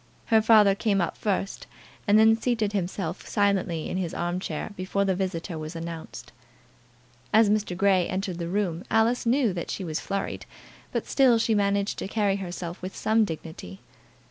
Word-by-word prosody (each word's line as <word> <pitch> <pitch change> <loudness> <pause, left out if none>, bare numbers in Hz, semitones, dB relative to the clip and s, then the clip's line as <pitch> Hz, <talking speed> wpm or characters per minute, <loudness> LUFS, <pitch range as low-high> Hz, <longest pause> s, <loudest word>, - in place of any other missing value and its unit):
Her 220 - +7
father 215 -3 +6
came 200 0 0
up 175 - -1
first, 195 -1 -2 0.4
and 205 +1 +6
had 220 +1 +5
seated 225 -4 0
himself 180 -2 -3
silently 195 -5 0
in - - -3
his 180 -3 -3
arm 175 +1 -2
chair 170 +2 -4
before 195 +2 -1
the 190 - +2
visitor 180 -3 -3
was 155 +2 -7
announced. 165 -1 -7 1.0
As 215 -1 +5
Mr. 210 -4 0
Grey 190 -2 +3
entered 185 -2 -3
the 170 0 -3
room 185 -3 -1
Alice 230 +2 +2
knew 240 -4 +3
that 170 -2 -5
she 195 - -4
was 160 -3 -3
flurried, 195 0 -4 0.4
but - - -2
still 260 -4 +4
she 225 0 +1
managed 200 0 +1
to - - -4
carry 200 -2 +1
herself 175 -2 -6
with 185 +1 -6
some 220 0 +2
dignity. 160 - -8
195 Hz, 170 wpm, -26 LUFS, 175-215 Hz, 1.0 s, Her